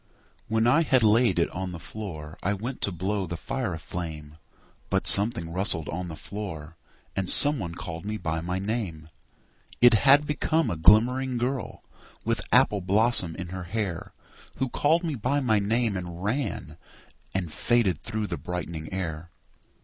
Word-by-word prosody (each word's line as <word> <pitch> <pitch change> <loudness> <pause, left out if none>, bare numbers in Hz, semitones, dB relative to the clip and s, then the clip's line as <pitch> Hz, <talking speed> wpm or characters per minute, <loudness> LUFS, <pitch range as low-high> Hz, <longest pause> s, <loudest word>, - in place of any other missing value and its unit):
When 110 +1 +1
I 140 +7 +4
had 130 -6 +3
laid 110 -2 +4
it 85 - +1
on 95 0 -5
the 85 - -7
floor 80 -6 -8
I 100 +2 0
went 120 +6 -6
to 100 - +1
blow 95 +2 -2
the 85 +1 -5
fire 125 -4 -3
aflame, 80 -2 -7 0.5
But - - 0
something 100 -5 +4
rustled 90 -4 +2
on 90 +4 -4
the 80 - -7
floor, 85 -5 -7 0.4
And 95 -2 0
some 145 -1 +7
one 85 -4 -5
called 80 -1 -7
me 105 +1 -4
by 80 -4 -3
my 90 +2 -3
name: 95 -7 -4 0.7
It 120 -1 +7
had 140 +6 +5
become 155 +2 0
a - - -2
glimmering 120 +9 +4
girl 125 -1 -3 0.4
With - - 0
apple 105 -2 +4
blossom 100 -2 +2
in 90 -2 -6
her 95 0 -6
hair 95 -3 -4 0.4
Who 130 - -2
called 160 +7 +2
me 165 -3 -2
by 135 +3 -1
my 110 -6 +2
name 110 +1 0
and 90 -1 -6
ran 125 +7 -3 0.6
And 90 -5 -2
faded 120 -6 +1
through 110 0 -3
the 85 -4 -4
brightening 80 0 -6
air. 85 -3 -4
100 Hz, 165 wpm, -26 LUFS, 85-120 Hz, 0.7 s, some